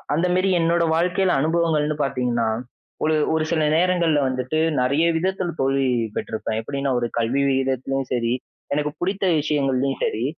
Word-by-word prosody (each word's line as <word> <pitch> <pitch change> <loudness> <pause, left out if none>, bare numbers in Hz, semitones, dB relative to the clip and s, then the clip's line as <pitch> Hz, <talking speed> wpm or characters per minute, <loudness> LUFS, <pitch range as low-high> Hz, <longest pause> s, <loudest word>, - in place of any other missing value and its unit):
அந்த 175 +3 +1
மேரி 190 +1 +2
என்னோட 170 +1 +2
வாழ்க்கைல 180 +2 +1
அனுபவங்கள்ன்னு 155 -2 +1
பார்த்தீங்கன்னா, 125 -4 0 0.6
ஒரு 155 0 +2 0.2
ஒரு 160 0 +1
சில 155 -2 +1
நேரங்கள்ல 170 -4 +2
வந்துட்டு 130 +4 -2 0.2
நிறைய 140 +6 +2
விதத்தில் 185 -1 -2
தோல்வி 135 0 +1 0.3
பெற்றுருப்பேன். 110 0 -3
எப்பிடீன்னா 140 +3 -2
ஒரு 120 - -1
கல்வி 120 +5 +1
விகிதத்திலேயும் 135 0 -1
சரி, 115 -1 0 0.4
எனக்கு 150 0 0
புடித்த 195 +2 -1 0.2
விஷயங்கள்லயும் 135 -2 0
சரி 115 +3 -1
145 Hz, 140 wpm, -22 LUFS, 130-170 Hz, 0.6 s, மேரி